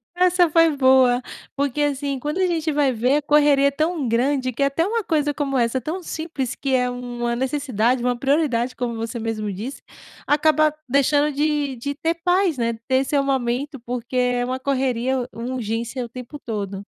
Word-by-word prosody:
Essa 360 Hz, -1 st, +4 dB
foi 330 Hz, -1 st, +4 dB
boa, 260 Hz, -2 st, +4 dB, 0.3 s
porque, 280 Hz, +1 st, -1 dB
assim, 280 Hz, -1 st, -1 dB
quando 295 Hz, +7 st, -3 dB
a 370 Hz, -, +3 dB
gente 325 Hz, -2 st, -1 dB
vai 285 Hz, -2 st, +2 dB
ver 250 Hz, +4 st, +2 dB
a 300 Hz, -, 0 dB
correria 290 Hz, -1 st, +4 dB
é 280 Hz, -, +1 dB
tão 310 Hz, -1 st, -1 dB
grande 255 Hz, +3 st, +1 dB
que 250 Hz, +3 st, -1 dB
é -, -, +4 dB
até 280 Hz, +5 st, +1 dB
uma 455 Hz, +2 st, -1 dB
coisa 295 Hz, -4 st, 0 dB
como 275 Hz, -2 st, -1 dB
essa, 235 Hz, +1 st, +1 dB
tão 315 Hz, +9 st, -4 dB
simples, 315 Hz, -7 st, -4 dB
que 270 Hz, -1 st, -2 dB
é 250 Hz, -1 st, +2 dB
uma 240 Hz, -1 st, -3 dB
necessidade, 255 Hz, -3 st, 0 dB
uma 250 Hz, 0 st, +1 dB
prioridade, 260 Hz, -2 st, +1 dB
como 240 Hz, -2 st, -3 dB
você 230 Hz, +1 st, -4 dB
mesmo 220 Hz, -2 st, -3 dB
disse, 230 Hz, +9 st, -6 dB, 0.4 s
acaba 305 Hz, +1 st, +3 dB, 0.2 s
deixando 285 Hz, +3 st, +3 dB
de 290 Hz, -2 st, 0 dB
de 280 Hz, +4 st, -4 dB
ter 325 Hz, +4 st, -1 dB
paz, 360 Hz, -3 st, +2 dB
né, 235 Hz, -1 st, 0 dB
de 225 Hz, -, -11 dB
ter 260 Hz, 0 st, +3 dB
seu 280 Hz, +1 st, +1 dB
momento, 270 Hz, +2 st, -1 dB
porque 245 Hz, +1 st, -6 dB
é 245 Hz, -1 st, +1 dB
uma 255 Hz, +1 st, -3 dB
correria, 260 Hz, -2 st, 0 dB
uma 240 Hz, +3 st, -5 dB
urgência 235 Hz, +2 st, -3 dB
o 235 Hz, -, -11 dB
tempo 255 Hz, +4 st, -9 dB
todo. 200 Hz, -5 st, -5 dB
265 Hz, 190 wpm, -22 LUFS, 245-295 Hz, 0.4 s, Essa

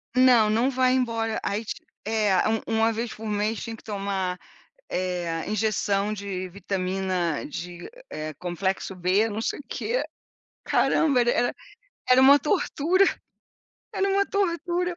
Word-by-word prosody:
Não, 250 Hz, -4 st, +6 dB
não 230 Hz, +5 st, +2 dB
vai 255 Hz, -1 st, +2 dB
embora. 230 Hz, -3 st, 0 dB
Aí 210 Hz, +3 st, -2 dB
ti -, -, -6 dB, 0.2 s
é, 210 Hz, -3 st, +2 dB
1 220 Hz, 0 st, +1 dB
1 225 Hz, 0 st, +2 dB
vez 230 Hz, +1 st, -3 dB
por 220 Hz, -, -9 dB
mês 210 Hz, +1 st, -1 dB
tinha 230 Hz, -1 st, -5 dB
que -, -, -17 dB
tomar, 195 Hz, -3 st, -2 dB, 0.5 s
eh, 175 Hz, -3 st, -2 dB
injeção 210 Hz, -1 st, 0 dB
de 190 Hz, -2 st, -5 dB
vitamina 185 Hz, -3 st, -2 dB
de, 175 Hz, +3 st, -7 dB, 0.2 s
eh, 155 Hz, 0 st, -5 dB
complexo 190 Hz, +2 st, -3 dB
B, 185 Hz, +5 st, +2 dB
não 215 Hz, +1 st, -3 dB
sei -, -, -2 dB
o 285 Hz, -, -9 dB
quê. -, -, -1 dB, 0.6 s
Caramba, 280 Hz, -6 st, +3 dB
era 240 Hz, 0 st, +3 dB
era 245 Hz, 0 st, +1 dB, 0.5 s
era 255 Hz, +1 st, +7 dB
uma 280 Hz, +2 st, +8 dB
tortura, 350 Hz, +3 st, +2 dB, 0.9 s
era 390 Hz, +1 st, +1 dB
uma 395 Hz, 0 st, +2 dB
tortura. 355 Hz, -2 st, -1 dB
220 Hz, 145 wpm, -25 LUFS, 190-255 Hz, 0.9 s, uma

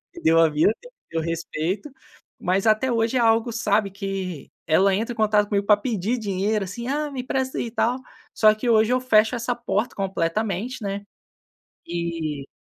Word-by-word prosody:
me 345 Hz, -, -9 dB
deu 165 Hz, 0 st, +5 dB
a 165 Hz, -, +5 dB
vida, 155 Hz, +8 st, +3 dB, 0.4 s
eu 165 Hz, 0 st, -1 dB
respeito, 165 Hz, -, -3 dB, 0.5 s
mas 190 Hz, +3 st, 0 dB
até 220 Hz, +4 st, +3 dB
hoje 230 Hz, +2 st, +1 dB
é -, -, +2 dB
algo, 230 Hz, 0 st, +3 dB
sabe, 210 Hz, -3 st, +1 dB
que 195 Hz, -5 st, -5 dB, 0.2 s
ela 190 Hz, +5 st, +4 dB
entra 230 Hz, +4 st, -2 dB
em -, -, -13 dB
contato 210 Hz, -1 st, +3 dB
comigo 200 Hz, -1 st, 0 dB
pra 210 Hz, -, +6 dB
pedir 220 Hz, +1 st, -1 dB
dinheiro, 205 Hz, -1 st, -1 dB
assim: 235 Hz, +6 st, -6 dB
"Ah, 295 Hz, +2 st, -1 dB
me 265 Hz, -2 st, -4 dB
empresta 260 Hz, +1 st, -2 dB
aí, -, -, -1 dB
e -, -, -8 dB
tal". 245 Hz, +2 st, 0 dB, 0.3 s
Só 215 Hz, -1 st, +5 dB
que 230 Hz, +3 st, -4 dB
hoje 220 Hz, 0 st, +4 dB
eu 255 Hz, -, +2 dB
fecho 220 Hz, -2 st, +3 dB
essa 240 Hz, +1 st, -2 dB
porta 235 Hz, -1 st, -2 dB
completamente, 200 Hz, +5 st, -2 dB
né, 200 Hz, 0 st, -3 dB, 0.8 s
e 165 Hz, -4 st, -3 dB
210 Hz, 180 wpm, -23 LUFS, 185-235 Hz, 0.8 s, pra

